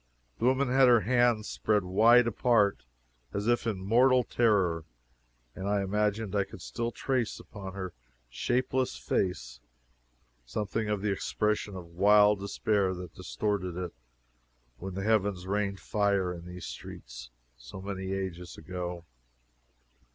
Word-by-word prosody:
The - - 0
woman 130 +1 +3
had 130 +1 +5
her 120 -2 +6
hands 120 -2 +2
spread 105 -2 +1
wide 115 +6 +5
apart, 115 - +2 0.5
as 100 +2 -2
if 120 -1 +2
in 110 -4 -1
mortal 125 +6 +4
terror, 95 -10 +2 0.7
and 95 +2 -4
I 100 -1 +1
imagined 105 +1 -1
I 100 - +3
could 90 - -11
still 115 0 -3
trace 125 -2 -1
upon 95 -2 -9
her 95 -2 -5 0.3
shapeless 125 - -1
face 60 -10 -2 0.8
something 105 - -3
of 105 -1 -1
the 105 - +1
expression 105 +1 -1
of 90 -2 -7
wild 105 +4 +4
despair 100 -1 0
that 90 -2 -8
distorted 95 -1 -2
it 90 -2 -4 0.9
when 95 0 -6
the 95 - -3
heavens 100 -4 +1
rained 100 0 -1
fire 100 -3 0
in 85 0 -9
these 90 0 -8
streets, - - -9 0.3
so - - -11
many 95 -1 -5
ages 90 -3 -5
ago. 90 0 -6
100 Hz, 135 wpm, -29 LUFS, 90-110 Hz, 0.9 s, her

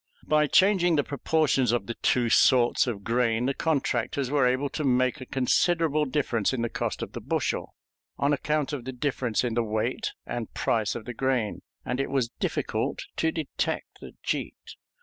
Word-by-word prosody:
By 150 -1 +3
changing 185 0 +4
the 145 - +2
proportions 140 -4 +1
of 120 -5 0
the 120 - -4
two 120 +1 +1
sorts 120 +1 +4
of 105 -5 -3
grain, 115 0 +1
the 135 - +1
contractors 135 -3 -1
were 140 -4 +3
able 130 +3 +1
to 155 - -4
make 130 -1 +2
a 130 - -8
considerable 155 +3 +2
difference 125 -5 0
in 120 -3 -1
the 120 - -1
cost - - -3
of - - -7
the - - -7
bushel, - - -2 0.4
on 145 +1 +2
account 150 +1 -1
of 130 -5 -4
the 130 - -5
difference 125 -3 -1
in 120 -2 -1
the 120 - +2
weight 110 -1 -2
and 120 -2 -4
price 110 -2 0
of 115 -2 -6
the 125 - -5
grain, 125 -3 -1 0.2
and 125 +2 -2
it 135 - -1
was 130 -4 0
difficult - - -2
to 160 - +1
detect 160 -4 -3
the - - -11
cheat. - - -4
130 Hz, 185 wpm, -27 LUFS, 120-145 Hz, 0.4 s, changing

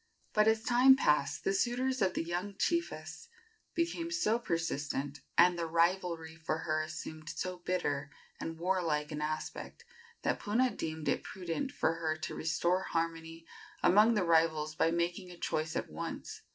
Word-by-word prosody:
But, 215 0 +4
as 220 0 +3
time 250 +3 +7
passed, 145 - +1
the 195 - +1
suitors 250 +5 0
of 185 -1 +2
the - - 0
young 180 +4 -3
chiefess 340 +6 -2 0.5
became 335 0 -1
so 235 -10 +1
persistent, 145 - -2 0.2
and 175 0 +6
the 165 - -1
rivalry 170 -1 +1
for 160 -1 -2
her 155 -1 +1
assumed 155 0 -7
so 180 0 -4
bitter 145 -6 -1 0.3
and 165 0 -5
warlike 165 -4 0
an 150 0 -4
aspect, 155 +1 -4 0.4
that - - +1
Puna 240 +4 +2
deemed 155 -1 -4
it - - +1
prudent 190 +9 -4
for 160 - +1
her 160 -1 -2
to 160 - -5
restore 175 +3 +1
harmony 165 -1 -3 0.4
among 210 +6 +6
the 205 - +2
rivals 160 -2 +3
by 160 - +2
making 170 +2 -1
a 175 - -11
choice 155 -1 -2
at - - -1
once. 75 - -6
170 Hz, 160 wpm, -32 LUFS, 155-200 Hz, 0.5 s, time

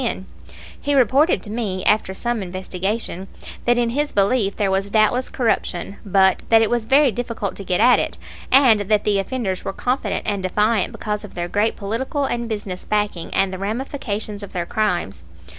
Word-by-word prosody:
Wynne. 190 -5 -2 0.6
He 285 -1 0
reported 265 - +3
to 210 - -5
me, 205 -5 -3
after 210 -3 +2
some 240 +1 -2
investigation, 190 +1 -3 0.4
that 240 0 +3
in 240 -1 +2
his 290 +4 -1
belief 200 0 +2
there 200 -3 0
was 195 +1 0
doubtless 220 +4 +2
corruption, 200 -6 -1
but 190 -1 +3
that 225 -1 +6
it 220 - 0
was 240 -2 0
very 275 +1 +5
difficult 230 -3 -4
to 200 - -7
get 180 -1 0
at 245 +3 +6
it, - - -2 0.3
and 255 -5 +6
that 205 +1 +1
the 205 -2 +2
offenders 195 -2 -3
were 195 - -4
confident 250 +5 -1
and 200 -2 -1
defiant 210 +2 +1
because 210 0 -4
of 210 - -11
their 175 -1 -2
great 205 +5 0
political 245 +7 -2
and 235 -2 -2
business 205 -4 -5
backing 210 -5 -1
and 195 -1 +1
the 185 - -5
ramifications 215 -1 -4
of 200 - -9
their 175 -1 -2
crimes. 175 - -1
210 Hz, 185 wpm, -21 LUFS, 195-240 Hz, 0.6 s, that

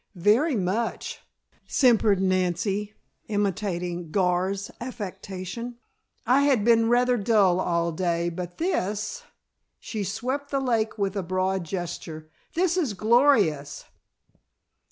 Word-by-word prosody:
"Very 220 - +3
much," 210 +4 -2 0.5
simpered 225 -6 +4
Nancy 190 +3 0 0.3
imitating 185 -4 -2
Gar's 190 +2 0
affectation. 205 0 -6 0.5
"I 260 +3 +4
had 270 -7 +3
been 230 -1 +4
rather 245 +1 +3
dull 200 -4 +3
all 170 -2 0
day, 170 0 0
but 175 +1 -6
this 215 - -2 0.3
" - - -53
she 215 -3 -4
swept 260 +9 -3
the 275 - 0
lake 230 -4 0
with 200 -1 -1
a 200 - 0
broad 185 0 -1
gesture 160 -3 -6 0.2
"this 355 +1 +2
is 280 - 0
glorious." 215 - +3
200 Hz, 115 wpm, -25 LUFS, 180-235 Hz, 0.5 s, simpered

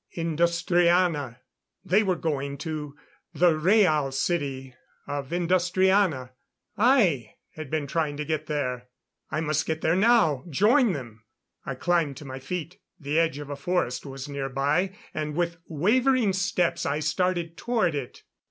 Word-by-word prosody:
Industriana! 170 -4 +1 0.4
They 195 +5 +4
were 190 -4 +1
going 140 -4 -3
to 150 -1 -5 0.4
the 175 +3 +5
Rhaal 155 -5 +3
City 135 -3 -2 0.3
of 140 -1 -5
Industriana. 180 -4 +2 0.4
I 205 - +3 0.2
had 155 -3 -8
been 155 -1 -1
trying 150 0 -1
to 150 - -3
get 155 0 -2
there. 125 -5 -2 0.4
I 155 - -2
must 155 -1 -1
get 160 0 -2
there 160 +2 +2
now 195 - +3
join 215 - +3
them. 120 -6 -8 0.4
I - - -3
climbed 165 -6 0
to 150 - -10
my 130 0 -7
feet; 175 +6 -6 0.2
the 150 +1 0
edge 165 -3 +1
of 145 -1 -7
a - - -3
forest 140 -4 -1
was 135 -1 -7
nearby 140 +7 -1 0.2
and 150 -1 -3
with 170 0 -1
wavering 225 - +2
steps 185 -3 0
I 140 +1 0
started 170 +2 -1
toward 220 -5 0
it. 140 -4 -6
160 Hz, 145 wpm, -26 LUFS, 140-180 Hz, 0.4 s, the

